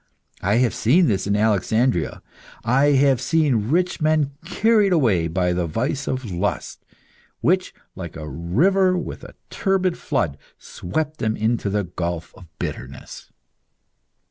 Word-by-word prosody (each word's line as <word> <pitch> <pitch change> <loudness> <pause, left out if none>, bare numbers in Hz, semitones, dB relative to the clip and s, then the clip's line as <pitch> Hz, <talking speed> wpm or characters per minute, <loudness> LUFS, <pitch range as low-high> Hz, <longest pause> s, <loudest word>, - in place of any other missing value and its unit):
I 100 +3 +1
have 120 0 +2
seen 165 +11 +3
this 100 -7 0
in 100 - +1
Alexandria; 110 -1 +1 0.4
I 135 +4 +3
have 135 -2 +3
seen 130 -8 +1
rich 180 +3 +1
men 155 -2 +2
carried 210 +2 +2
away 105 - +2
by 90 +1 0
the 90 -1 -1
vice 130 - -2
of 130 -5 -3
lust, 90 +4 -3 0.6
which, - - +2 0.2
like - - -7
a 75 -1 -7
river 170 - +2
with 175 - -6
a - - -12 0.2
turbid 190 -3 0
flood, 85 - -1 0.2
swept 155 - -4
them 110 0 -1
into 110 -1 0
the 105 +1 0
gulf 85 -1 -4
of 90 - -14
bitterness." - - -7
120 Hz, 140 wpm, -22 LUFS, 95-155 Hz, 0.6 s, seen